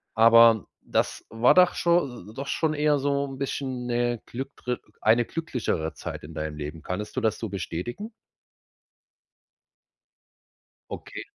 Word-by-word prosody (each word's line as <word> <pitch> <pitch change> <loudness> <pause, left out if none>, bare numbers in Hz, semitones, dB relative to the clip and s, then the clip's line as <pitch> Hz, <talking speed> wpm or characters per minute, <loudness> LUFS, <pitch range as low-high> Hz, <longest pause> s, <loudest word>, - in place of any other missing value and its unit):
Aber 115 -1 +7
das - - -1
war 115 +2 +4
doch 180 -1 +5
scho 140 - 0
äh, - - -12
doch 140 +4 -6
schon 160 -2 0
eher 150 -1 +2
so 140 0 0
'n 135 -1 -8
bisschen 130 -2 -3
'ne 120 -1 0
glückre 125 -1 -5 0.2
eine 115 +2 +4
glücklichere 115 - -2
Zeit - - -7
in - - -10
deinem 75 -1 -4
Leben. 75 +2 -6
Könntest 105 +4 -5
du 130 - 0
das 110 -2 0
so 115 - -3
bestätigen? 100 - -5 2.8
Okay. - - -7
120 Hz, 135 wpm, -26 LUFS, 110-140 Hz, 2.8 s, Aber